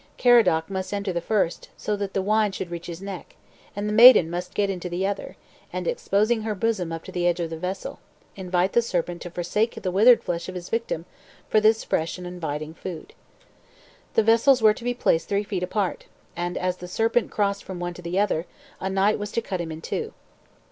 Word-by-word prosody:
Caradoc 220 -10 +4
must 190 0 -3
enter 200 -2 -2
the 170 - -1
first, 195 -3 -1
so 210 - -2
that 200 -1 -5
the 195 - +1
wine 215 +1 +2
should 185 -2 -6
reach 170 0 -6
his 175 +2 -7
neck, 195 -3 -8 0.4
and 205 +1 -3
the 210 - -1
maiden 225 -7 +8
must 180 +2 -5
get 205 - +2
into 180 -2 -4
the 175 +2 -1
other, 200 0 -4 0.3
and, - - -4
exposing 220 - +1
her 215 -1 -2
bosom 195 -5 -1
upon 165 0 -7
the 175 -1 +1
edge 175 0 +1
of 165 -1 -3
the - - -3
vessel, 185 +3 -5 0.4
invite 185 0 0
the 235 - +5
serpent 175 -5 -2
to 175 - -6
forsake 180 +7 -1
the 185 - -2
withered 225 +6 +6
flesh 170 0 -3
of 185 - -7
his 175 0 -7
victim 225 -8 -2 0.4
for 215 - +4
this 220 +1 +4
fresh 160 +3 -1
and 180 - -8
inviting 160 -3 -5
food. 170 -1 -8 1.0
The 225 - +5
vessels 230 +4 +5
were 215 -2 +6
to 235 - -11
be 245 0 -1
placed 165 -8 +1
three 200 +1 +1
feet 200 -3 -3
apart, 190 +1 -2 0.3
and 175 +1 -3
as 180 0 -1
the 180 - -8
serpent 225 +5 +1
crossed 200 -1 -1
from 185 -2 -7
one 175 0 -3
to 180 - -11
the 175 +2 -3
other. 190 -5 +1 0.3
a 190 - -2
knight 195 +2 +2
was 205 0 -5
to - - +1
cut 185 -5 -3
him 165 -1 -5
in 160 0 -7
two. 450 - -4
190 Hz, 215 wpm, -24 LUFS, 175-215 Hz, 1.0 s, maiden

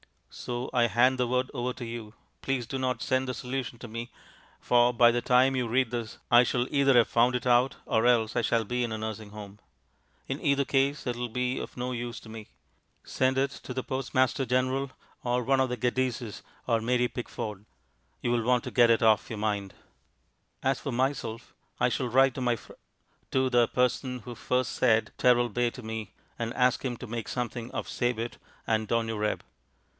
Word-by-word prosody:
So 120 +1 -5
I 120 -1 +4
hand 125 +4 +3
the 125 - +2
word 125 +1 0
over 125 +1 -2
to 120 - -7
you. 115 -2 -7 0.3
Please 135 -3 -1
do 135 +4 -4
not 130 -1 -1
send 130 0 +1
the 125 - -2
solution 125 0 -4
to 120 - -8
me, 115 +2 -6 0.5
for 120 0 +4
by 120 0 +6
the 120 0 0
time 130 +2 +4
you 125 -2 0
read 125 +1 +1
this 115 -3 -4
I 120 +1 +8
shall 125 0 0
either 140 -1 +4
have 120 -2 +5
found 120 +2 +3
it 125 - -2
out 125 +1 +3
or 110 +2 +2
else 115 -2 +3
I 120 - +2
shall 115 0 +1
be 125 +3 -1
in 115 -2 -2
a - - -2
nursing 110 -1 -5
home. 105 -1 -10 0.7
In - - -4
either 140 0 +2
case 140 +2 +1
it 120 -2 -2
will 120 0 -3
be 125 +2 -1
of - - -8
no 125 +1 -2
use 120 -1 -4
to 110 - -13
me. 110 -1 -9 0.6
Send 130 0 0
it 135 +1 +1
to 125 - -7
the 130 - -2
Postmaster 130 0 0
General 130 +2 0 0.3
or 125 0 0
one 135 +2 +2
of 130 -1 +2
the 125 - -2
Geddeses 125 -2 -1 0.2
or 115 -2 +1
Mary 125 +1 +1
Pickford. 105 -4 -6 0.6
You 120 - 0
will 120 -1 +1
want 125 +1 +2
to - - -6
get 120 -2 +5
it 115 0 +3
off 110 -1 +4
your 110 - -5
mind. 105 -2 -2 0.9
As 135 0 +1
for 140 - -4
myself 125 -3 -2 0.3
I - - +3
shall 125 - -1
write 135 +2 +4
to - - -4
my 120 -1 +2
fr, 110 - -14 0.6
to 130 0 +2
the 120 -2 +4
person 125 +1 0
who 120 +1 -8
first 125 +2 -1
said 115 -3 +2
"Teralbay" 120 -1 +3
to 125 - -10
me, 110 -2 -5 0.3
and 115 0 -2
ask 125 -1 +2
him 125 -3 -2
to - - -8
make 115 -1 -5
something 120 -1 -4
of - - -4
"sabet" 120 -1 -2 0.3
and 110 -1 0
"donureb." 110 -2 0
120 Hz, 200 wpm, -28 LUFS, 115-130 Hz, 0.9 s, I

